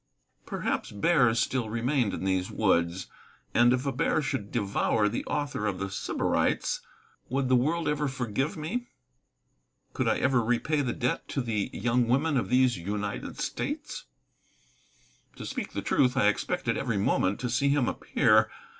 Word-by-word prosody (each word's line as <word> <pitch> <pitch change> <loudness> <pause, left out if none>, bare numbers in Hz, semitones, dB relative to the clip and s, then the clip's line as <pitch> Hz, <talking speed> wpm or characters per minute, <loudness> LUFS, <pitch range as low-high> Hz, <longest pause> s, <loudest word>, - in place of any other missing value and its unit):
Perhaps - - -2
bears 120 0 +3
still 125 -3 0
remained 120 0 0
in - - -5
these 95 -1 0
woods. 85 +2 +1 0.5
And 120 0 +5
if 130 +2 0
a 140 - +1
bear 130 - +1
should 130 -8 -3
devour 105 +1 +1
the 105 - -2
author 145 -7 -2
of 100 -3 -1
The 95 0 -4
Sybarites, 100 - 0 0.5
would 135 0 0
the 130 - +5
world 155 +7 +1
ever 150 0 0
forgive 135 - -2
me? 230 +11 -3 1.1
Could - - -1
I - - +2
ever 130 -3 +2
repay 125 +6 +1
the 130 - -1
debt 125 +1 -2
to 135 - -2
the 110 -4 -1
young 120 0 +1
women 140 +6 +2
of 125 - 0
these 125 -3 +3
United 100 +3 -4
States? - - -4 1.3
To - - -8
speak - - -4
truth, 125 0 +2
I 115 -5 +5
expected 105 - -1
every 115 - -1
moment 95 0 +1
to 125 - -2
see 140 +4 +2
him 140 -4 +2
appear. 110 -2 +3
125 Hz, 155 wpm, -28 LUFS, 105-135 Hz, 1.3 s, And